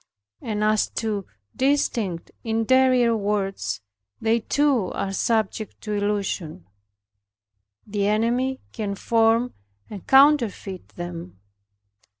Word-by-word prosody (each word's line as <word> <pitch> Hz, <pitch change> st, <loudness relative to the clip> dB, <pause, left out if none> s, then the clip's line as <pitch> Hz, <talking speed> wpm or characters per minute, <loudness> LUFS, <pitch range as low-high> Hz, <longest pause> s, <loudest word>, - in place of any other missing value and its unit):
And 210 Hz, -2 st, -2 dB
as 215 Hz, 0 st, +2 dB
to 210 Hz, -4 st, -2 dB, 0.3 s
distinct 245 Hz, -10 st, 0 dB
interior 240 Hz, +1 st, +3 dB
words, 195 Hz, -, -2 dB, 0.4 s
they 225 Hz, +1 st, +2 dB
too 260 Hz, -4 st, +1 dB
are 195 Hz, -, -3 dB
subject 220 Hz, 0 st, -1 dB
to 210 Hz, -, -5 dB
illusion; 200 Hz, -, -2 dB, 1.2 s
the 200 Hz, -1 st, -1 dB
enemy 240 Hz, +5 st, +1 dB
can 205 Hz, -3 st, -3 dB
form 230 Hz, +3 st, +2 dB, 0.4 s
and 200 Hz, -4 st, -9 dB
counterfeit 265 Hz, -9 st, +3 dB
them. 170 Hz, -, -7 dB
215 Hz, 95 wpm, -24 LUFS, 200-235 Hz, 1.2 s, interior